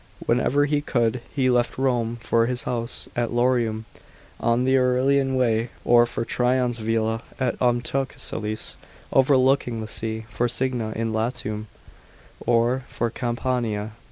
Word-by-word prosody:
Whenever 145 +2 +2
he 145 0 +1
could, 120 -3 0
he 135 -3 +1
left 125 -1 +1
Rome 120 -3 0
for 115 0 +1
his 125 0 -2
house 120 0 -3
at 120 -1 0
Lorium 120 -3 +1 0.5
on 115 +1 +2
the 130 +1 +3
Aurelian 130 +1 +2
Way, 115 -2 +1 0.2
or 120 0 +6
for 115 - -3
Trajan's 125 -1 +1
villa 115 0 0 0.2
at 130 -3 0
Ontumcellse, 120 -3 -1 0.4
overlooking 130 -3 +3
the 110 - -5
sea, 110 0 -3
for 115 +2 -1
Signia 120 -3 -1
in 115 0 -2
Latium, 110 -1 -2 0.8
or 120 +2 +2
for 120 -1 -2
Campania. 120 -3 -2
120 Hz, 130 wpm, -24 LUFS, 115-130 Hz, 0.8 s, or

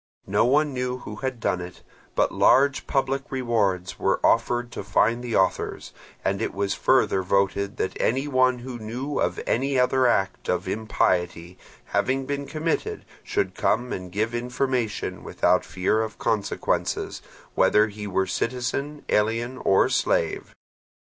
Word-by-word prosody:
No 100 +3 +2
one 145 +3 +3
knew 125 0 -2
who 105 -4 -8
had 130 0 -3
done 90 -5 0
it, 90 +1 -10 0.3
but - - +2
large 140 +1 +3
public 135 0 -1
rewards 105 -8 0
were 95 - +1
offered 120 +1 +2
to - - -6
find 115 +3 +2
the 120 -2 -2
authors; 95 -1 0 0.3
and 100 +2 0
it - - -2
was 100 0 0
further 95 - +2
voted 100 +1 0
that 95 - -2
any 135 +5 +1
one 130 -2 +3
who 125 -2 -6
knew 125 +6 -4
of - - 0
any 135 +3 +1
other 130 0 +3
act 95 -5 0
of - - 0
impiety 90 -5 0 0.3
having 135 +1 0
been 140 0 -3
committed 165 - -2 0.2
should 400 -1 -1
come 125 +1 0
and 90 -1 -6
give 110 +4 -1
information 125 -1 -2
without - - +2
fear 95 +4 0
of 110 0 -4
consequences, 105 -3 -1 0.3
whether 105 0 +4
he 105 0 -7
were 95 -1 +1
citizen, 130 +8 -3
alien, 115 +4 0
or 95 - +4
slave. - - 0
120 Hz, 150 wpm, -25 LUFS, 100-130 Hz, 0.3 s, whether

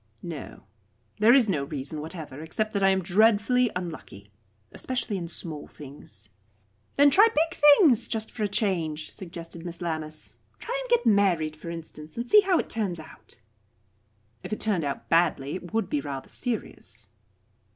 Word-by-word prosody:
"No. 165 -5 -8 0.6
There 225 +4 +7
is 255 -5 +5
no 155 -8 0
reason 145 +1 -4
whatever, 155 -3 -7
except 215 +7 -3
that 200 - 0
I 195 - +5
am 190 -1 +1
dreadfully 220 +6 +3
unlucky, 155 - -7 0.4
especially 245 -5 -2
in 175 -3 -4
small 160 -3 -3
things." 130 -8 -9 0.7
"Then 285 0 +6
try 410 +10 +7
big 330 -5 0
things, 290 - +6
just 220 -1 -3
for 220 - -7
a 210 - +2
change," 170 -7 -1
suggested 170 -2 -8
Miss 170 -1 -5
Lammas. 155 -2 -4 0.2
"Try 485 - -5
and - - -8
get 480 - +3
married, 185 -8 +3
for 155 +2 -9
instance, 160 -1 -9
and 235 +1 -3
see 420 - +7
how 380 -3 +2
it - - -1
turns 195 -7 -2
out." 155 -5 -11 1.0
"If - - -8
it 215 - -2
turned 200 -7 0
out 140 -1 -4
badly, 160 -4 +2
it 180 -2 -7
would 225 +1 0
be 295 -1 -1
rather 135 - -6
serious." 245 -3 -5
180 Hz, 165 wpm, -26 LUFS, 155-225 Hz, 1.0 s, There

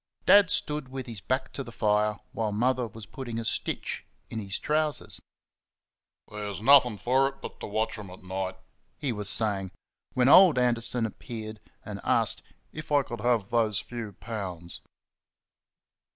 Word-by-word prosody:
Dad 200 -2 +7
stood 150 -5 -1
with 130 -1 -5
his 115 -5 -6
back 130 +3 -2
to 135 - -3
the 120 - -10
fire 105 -1 +1
while 110 -2 -2
Mother 125 +3 +1
was 110 0 -11
putting 120 -4 -6
a 115 - -3
stitch - - -2 0.3
in 115 - -3
his 100 -2 -2
trousers. 150 0 0 1.1
"There's 105 -1 -5
nothing 125 -2 +6
for 130 +5 +3
it 135 - -5
but - - -9
to - - -6
watch 110 +2 -1
them 105 -3 -8
at 90 +1 -12
night," 95 0 -4 0.4
he 140 - -2
was 105 -3 +1
saying, 100 -4 +2 0.5
when 125 0 +3
old 175 -1 +8
Anderson 120 -1 +2
appeared 110 -1 -7 0.3
and - - -6
asked - - +2 0.3
"if 155 0 -8
I 145 -1 +4
could 120 -4 -7
have 115 -4 +1
those 110 -4 +2
few 115 -3 -5
pounds." 95 -6 -6
115 Hz, 160 wpm, -28 LUFS, 105-130 Hz, 1.1 s, old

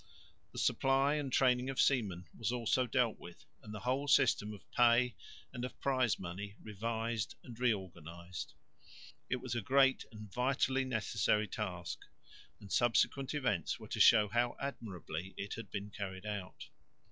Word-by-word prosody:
The - - -12
supply 135 +2 +3
and 145 -3 -2
training 125 0 +3
of 135 - -3
seamen 100 -10 +2
was 115 +1 -1
also 125 +1 +1
dealt 120 -2 +1
with, 85 - -12 0.2
and 105 - -10
the 105 - -6
whole 130 +3 0
system 115 -6 +4
of 105 - -10
pay 120 0 +4 0.4
and 125 - -5
of 125 - -6
prize 130 -4 +2
money 95 +3 -6
revised 115 +1 -3
and 120 -2 -11
reorganised. 90 -7 -3 0.7
It - - +2
was 125 -1 -5
a 120 - -1
great 135 +4 +3
and 110 -2 -10
vitally 130 +1 +1
necessary 110 -3 +1
task, 90 -6 -4 0.6
and 100 - -12
subsequent 130 +4 +2
events 105 - 0
were - - -11
to - - -3
show 110 -3 +7
how 120 +3 +1
admirably 95 - -5
it 100 - -4
had 115 -3 -7
been 100 0 -5
carried 95 -2 -6
out. 105 -3 -6
115 Hz, 155 wpm, -34 LUFS, 100-130 Hz, 0.7 s, show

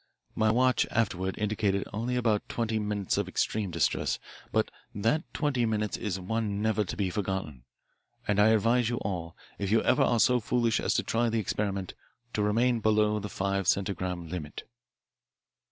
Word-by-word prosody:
My 110 -1 +2
watch 125 +2 +3
afterward 95 -4 -1
indicated 105 -2 0
only 115 +4 -1
about 115 -4 +1
twenty 115 -2 -1
minutes 105 -2 -1
of - - -1
extreme 105 -3 -1
distress, 85 -2 0 0.3
but - - +1 0.2
that 115 - 0
twenty 145 -6 0
minutes 105 -1 -1
is 95 -4 -3
one 105 +1 -2
never 110 0 +1
to 95 - -6
be 95 -3 0
forgotten, 95 - -3 0.6
and 105 -1 +2
I 105 - +6
advise 115 +2 +3
you 120 - -1
all, 85 -4 -4 0.2
if 100 - -1
you 110 +2 +3
ever 125 - +3
are 120 - +3
so 125 +2 +4
foolish 115 -1 +1
as - - 0
to - - +2
try 115 +1 +1
the 115 - 0
experiment, 100 -2 -2 0.4
to 105 - 0
remain 115 +4 +2
below 105 0 +2
the 105 0 -5
five 100 -1 -1
centigram 90 -3 0
limit. 80 -3 -6
105 Hz, 170 wpm, -29 LUFS, 95-115 Hz, 0.6 s, I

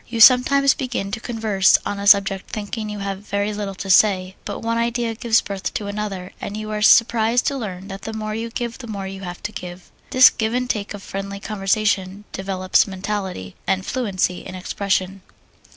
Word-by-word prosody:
You 230 -1 -4
sometimes 270 +4 +7
begin 245 -7 -3
to 220 - -3
converse 220 -5 +3
on 205 - -3
a 200 - -3
subject 200 -1 +4
thinking 215 +1 -4
you 210 - -5
have 195 -1 -3
very 205 0 -2
little 205 -2 -4
to 195 - -6
say, 185 -1 +4
but - - -5
one 230 0 -1
idea 235 0 -1
gives 225 0 +2
birth 195 -1 -4
to 210 - -2
another, 200 -3 -4
and 205 - -5
you 215 0 -5
are 210 0 -2
surprised 230 +1 +4
to 280 - 0
learn 195 -7 -6
that 195 0 -7
the 220 - -5
more 215 -1 -4
you 225 +2 -3
give 235 0 -4
the 245 - -8
more 200 -3 -5
you 190 0 -7
have 175 -2 -7
to 210 - -3
give. 180 -2 -9 0.2
This 255 0 +8
give 220 +1 -2
and 250 0 0
take 210 -3 -2
of 200 - -10
friendly 195 0 -5
conversation 200 -1 -1
develops 190 0 +1
mentality, 190 - -4
and 190 -1 0
fluency 195 -7 -1
in 185 - -8
expression. 190 0 -2
205 Hz, 200 wpm, -21 LUFS, 195-225 Hz, 0.2 s, This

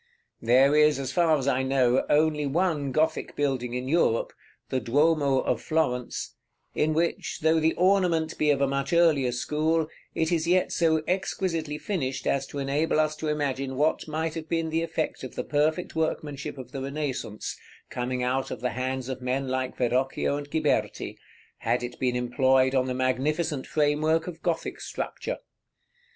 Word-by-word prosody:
There 130 +5 +5
is, 150 -2 +5
as 135 -1 -3
far 160 0 +3
as 135 -1 -3
I 130 -1 +2
know, 130 -2 +2
only 150 -1 +3
one 150 -2 0
Gothic 155 +3 0
building 130 -4 -1
in 125 +1 -3
Europe, 140 -7 +2 0.4
the 130 - 0
Duomo 140 +2 +2
of 115 - -1
Florence, 125 -6 -1 0.4
in 155 0 +1
which, 170 +1 -1
though 160 +1 +4
the 160 +1 +2
ornament 180 -4 +2
be 150 - +3
of 140 -1 +3
a 140 - +4
much 140 +2 -2
earlier 155 -7 +4
school, 155 +5 0 0.3
it 160 +1 0
is 165 -1 +1
yet 180 +1 +3
so 160 -2 +2
exquisitely 165 -4 -1
finished 135 - -3
as 135 0 0
to - - -8
enable 145 +3 +1
us 155 0 +1
to 155 - -4
imagine 140 -3 -1
what 150 +4 +1
might 160 +1 -2
have 160 -1 -6
been 165 -1 -1
the 165 +1 +1
effect 160 -3 -3
of 130 - -7
the - - -2
perfect 155 +5 0
workmanship 150 -3 -2
of 130 -2 -9
the 135 - -5
Renaissance, 135 -6 -4 0.4
coming 125 0 -2
out 130 +2 0
of 125 - -5
the 125 +1 -1
hands 130 0 -3
of 130 -1 -5
men 130 +1 -1
like 130 0 -2
Verrocchio 130 +3 +1
and 145 0 -6
Ghiberti, 160 - 0 0.4
had 125 0 0
it 120 0 -6
been 125 -2 +1
employed 130 +2 +3
on 130 -1 +2
the 125 - -2
magnificent 135 +3 0
framework 155 +2 +2
of 175 -3 -8
Gothic 170 -2 -2
structure. - - -4
145 Hz, 170 wpm, -27 LUFS, 130-160 Hz, 0.4 s, There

